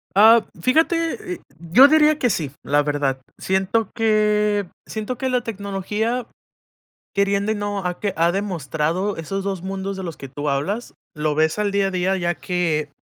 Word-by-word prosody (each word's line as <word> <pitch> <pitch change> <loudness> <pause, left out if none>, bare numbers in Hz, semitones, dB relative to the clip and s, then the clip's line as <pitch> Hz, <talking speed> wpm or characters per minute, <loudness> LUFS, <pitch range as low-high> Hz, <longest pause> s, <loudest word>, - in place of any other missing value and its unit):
Ah, 225 +3 +7 0.2
fíjate, 320 - +1
eh, - - -13 0.2
yo 170 - +6
diría 305 0 +4
que 250 - +2
sí, 160 - -1
la 145 +1 +2
verdad. 145 -3 -1 0.2
Siento 190 +3 0
que 210 -2 +2 0.2
siento 220 +3 -4
que 260 +2 -2
la 250 -1 +2
tecnología 215 +2 -3 0.9
queriendo 200 +1 +1
y - - 0
no, 205 -1 -2
ha 180 0 -2
que 205 -2 -1
ha 170 +1 +3
demostrado 180 0 -1
esos 195 +5 -4
2 190 -3 -3
mundos 195 +1 -4
de 190 - -5
los 170 -3 -5
que 135 - -8
tú 145 +3 -5
hablas, 185 - -2 0.2
lo 150 -1 -1
ves 160 +3 +2
al 205 -1 +1
día 200 -1 +2
a - - -3
día, 185 +1 +1
ya 175 -1 -1
que 165 -5 -1
195 Hz, 175 wpm, -22 LUFS, 170-215 Hz, 0.9 s, Ah